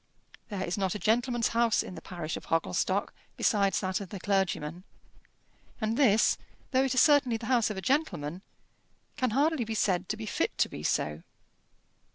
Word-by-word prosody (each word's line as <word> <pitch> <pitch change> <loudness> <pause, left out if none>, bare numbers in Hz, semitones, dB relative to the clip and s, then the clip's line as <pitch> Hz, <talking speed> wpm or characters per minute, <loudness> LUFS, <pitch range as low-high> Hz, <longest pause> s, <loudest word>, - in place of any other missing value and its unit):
There 200 -3 -3
is 180 +3 -2
not 190 -1 0
a - - -1
gentleman's 240 +2 +1
house 235 -1 +2
in - - -8
the 165 - -9
parish 170 -4 -5
of - - -8
Hogglestock 165 0 0 0.2
besides 200 -3 +2
that 190 +1 -1
of 195 - -7
the 200 - -7
clergyman; 185 -4 -1 1.0
and 220 0 -1
this, 230 -6 +4 0.3
though 260 +1 +3
it 260 -1 -1
is - - +6
certainly 285 -6 +4
the 225 - -8
house 240 -2 +2
of 210 - -4
a - - -3
gentleman, 185 - -1 0.7
can 255 -2 0
hardly 285 +3 +2
be 220 0 -4
said 185 -3 0
to 215 - -2
be 220 - -6
fit - - -1
to - - +3
be - - -8
so. 75 +1 -1
215 Hz, 185 wpm, -29 LUFS, 185-245 Hz, 1.0 s, is